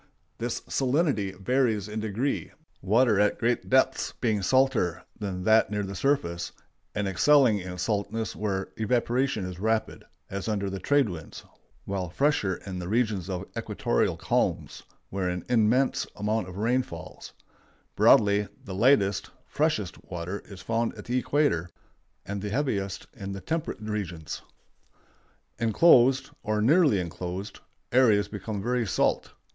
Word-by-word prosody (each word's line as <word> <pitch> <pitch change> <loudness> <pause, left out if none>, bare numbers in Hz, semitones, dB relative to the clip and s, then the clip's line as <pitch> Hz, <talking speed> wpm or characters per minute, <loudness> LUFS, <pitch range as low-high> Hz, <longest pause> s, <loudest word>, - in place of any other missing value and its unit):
The - - -1
salinity 130 - 0
varies 110 -1 +1
in 105 +1 -4
degree, 110 +6 -2 0.3
water 110 +2 +3
at 105 0 +3
great 120 +1 0
depths 130 0 +2
being 110 -4 +1
salter 130 -5 +2 0.2
than 95 -3 -4
that 110 +3 +4
near 105 0 -2
the 100 0 -5
surface, 95 -8 0 0.4
and 105 -1 -1
excelling 120 +3 +4
in 90 -1 -7
saltness 105 +3 -2
where 95 -2 -2
evaporation 120 0 0
is 90 -1 -7
rapid, 110 +2 -1 0.2
as 100 +1 -5
under 100 -3 -1
the 95 - -4
trade 145 +5 +3
winds, 85 -5 -8 0.4
while 95 -3 -3
fresher 120 - +1
in 95 -2 -5
the 90 - -5
regions 105 -5 0
of 95 0 -3
equatorial - - 0
calms, - - -1 0.3
where 95 -2 -1
an 90 -1 -4
immense 120 +3 +2
amount 105 -1 -1
of 90 - -9
rain 120 +5 +2
falls; 85 -10 -10 0.6
broadly, 100 -1 +5 0.2
the 95 - -6
lightest 100 -3 +3 0.2
(freshest) 125 - -1
water 90 +2 -5
is 95 -3 -11
found 115 0 -1
at - - -10
the 125 +2 0
equator, 125 - +1 0.6
and 100 0 -4
the 105 - -3
heaviest 100 -7 -2
in 100 -3 -6
the 95 - -5
temperate 160 -6 -3
regions. 100 -7 -5 1.2
Inclosed, 130 +2 +5
or 105 0 -1
nearly 140 - +4
inclosed, 90 +3 -5 0.3
areas 115 -5 +4
become 105 -1 -5
very 120 -1 0
salt. - - 0
105 Hz, 140 wpm, -27 LUFS, 95-125 Hz, 1.2 s, broadly